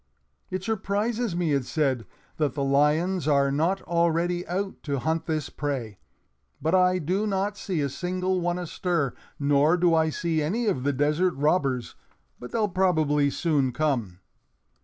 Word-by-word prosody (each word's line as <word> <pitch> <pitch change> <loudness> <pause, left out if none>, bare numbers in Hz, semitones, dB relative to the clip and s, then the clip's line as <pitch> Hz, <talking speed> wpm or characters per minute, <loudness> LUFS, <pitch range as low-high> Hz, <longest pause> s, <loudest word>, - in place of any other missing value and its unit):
"It 185 0 -4
surprises 215 +1 -1
me," 170 -4 +1
it 140 -2 +1
said, 135 -4 -1 0.3
"that 145 -5 0
the 140 - -1
lions 150 +6 +2
are 140 -2 +3
not 165 +7 0
already 170 +1 0
out 190 +3 -3
to 140 -2 -2
hunt 160 +5 -1
this 155 -3 -2
prey, 130 -9 -4 0.6
but 160 +3 -1
I 185 0 +4
do 185 +6 -1
not 200 +1 -1
see 185 -6 -2
a 140 - +1
single 185 +4 -1
one 175 0 0
astir; 175 -5 -1 0.2
nor 145 +3 +3
do 175 -1 +3
I 160 -1 +3
see 160 0 -1
any 210 +11 -1
of 190 -12 0
the 140 +2 +1
desert 150 +6 +1
robbers, 140 -4 0 0.5
but 125 - -8
they'll 220 -2 +1
probably 155 -6 +2
soon 140 -4 +1
come." 120 -12 -1
160 Hz, 160 wpm, -26 LUFS, 145-185 Hz, 0.6 s, I